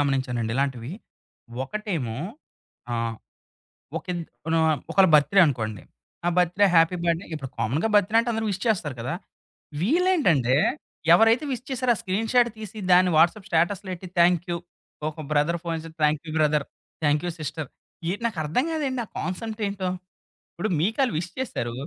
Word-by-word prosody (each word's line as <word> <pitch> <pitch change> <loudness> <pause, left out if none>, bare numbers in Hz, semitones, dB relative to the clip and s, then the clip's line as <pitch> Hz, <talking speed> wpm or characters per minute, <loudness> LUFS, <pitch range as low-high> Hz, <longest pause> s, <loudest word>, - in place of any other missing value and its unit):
గమనించానండి 130 -5 0
ఇలాంటివి. 135 -1 -1 0.7
ఒకటేమో 155 - -3 0.7
ఆహ్, 115 -1 -1 0.8
ఒకిన్ 175 -1 -4 0.4
ఆహ్, 160 -2 +3
ఒకళ్ళ 195 -1 +5
బర్త్‌ 150 +4 +5
డే - - +9
అనుకోండి. 110 -7 -2 0.4
ఆ - - +4
బర్త్‌ 180 0 +2
డే 205 - +8
హ్యాపీ 165 +2 +5
బర్డ్‌డే 170 +2 0
ఇప్పుడు 135 -4 -6
కామన్‌గా 130 - 0
బర్త్‌ 205 0 +4
డే - - +4
అంటే 235 - -2
అందరూ 220 0 -1
విష్ 195 -1 -4
చేస్తారు 180 - 0
కదా! 125 +8 -3 0.7
వీళ్ళేంటంటే 210 - +3 0.6
ఎవరైతే 225 - +5
విష్ 255 0 -5
చేసారో, 255 -1 +2
ఆ - - -7
స్క్రీన్‌ 205 +4 -1
షాట్ 245 -1 +5
తీసి 215 0 -8
దాన్ని 180 0 +6
వాట్సాప్ 175 +5 +3
స్టాటస్‌లో 185 +4 +1
ఎట్టి 185 +1 -10
థాంక్ 175 0 +4
యూ. 170 - 0 0.5
ఒక 155 0 -7
బ్రదర్ 155 +4 +2
ఫోన్ 165 -1 -2
చేసి 165 - -10
thank 150 +1 +2
you 155 - -5
brother, 150 -1 +2 0.4
thank 150 +2 +2
you - - -1
sister 155 +1 -4 0.4
ఏటి 205 +5 -4
నాకు 225 -7 -3
అర్థం 160 - +1
గాదండి, 275 -5 -1
ఆ - - -30
కాన్సెప్ట్ 220 +4 -4
ఏంటో. 195 -2 -3 0.7
ఇప్పుడు 195 +5 -2
మీకు 215 - 0
అళ్ళు 250 - -2
విష్ 175 +1 -4
చేసారు 120 - -3
175 Hz, 165 wpm, -25 LUFS, 150-215 Hz, 0.8 s, డే